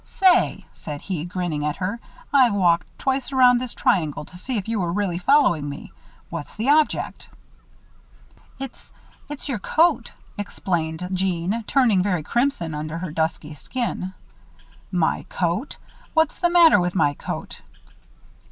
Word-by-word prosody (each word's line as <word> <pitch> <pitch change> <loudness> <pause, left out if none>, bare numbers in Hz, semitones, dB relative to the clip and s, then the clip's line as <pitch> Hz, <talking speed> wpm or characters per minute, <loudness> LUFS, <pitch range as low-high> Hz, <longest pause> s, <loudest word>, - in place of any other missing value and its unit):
"Say," 375 -2 +2
said 150 -2 -7
he, 175 -5 -4
grinning 175 -4 -3
at 150 0 -1
her, 200 +4 -3 0.3
"I've 250 -6 +5
walked 175 -4 +3
twice 265 0 -1
around 250 -2 +5
this 255 -2 -6
triangle 155 -5 +1
to 180 - -14
see 240 +7 -4
if 200 - -4
you 225 -1 -1
were 175 -2 -1
really 185 -2 -1
following 180 - +3
me. 140 - -8 0.4
What's 165 -3 -6
the 225 +6 -1
object?" 305 0 +1 1.3
"It's 270 -2 -9 0.4
it's 295 0 -7
your 255 -7 -2
coat," 330 - +2 0.3
explained 175 -4 -2
Jeanne, 185 +3 -1
turning 235 -9 +3
very 180 -4 0
crimson 235 - 0
under 155 +2 -4
her 170 -2 -5
dusky 160 -1 -2
skin. 190 - -4 0.8
"My - - +1
coat! - - -2 0.4
What's 320 -1 +2
the 350 - +3
matter 340 -9 +7
with 180 0 -1
my 145 -6 +3
coat?" - - -6
190 Hz, 145 wpm, -23 LUFS, 165-255 Hz, 1.3 s, matter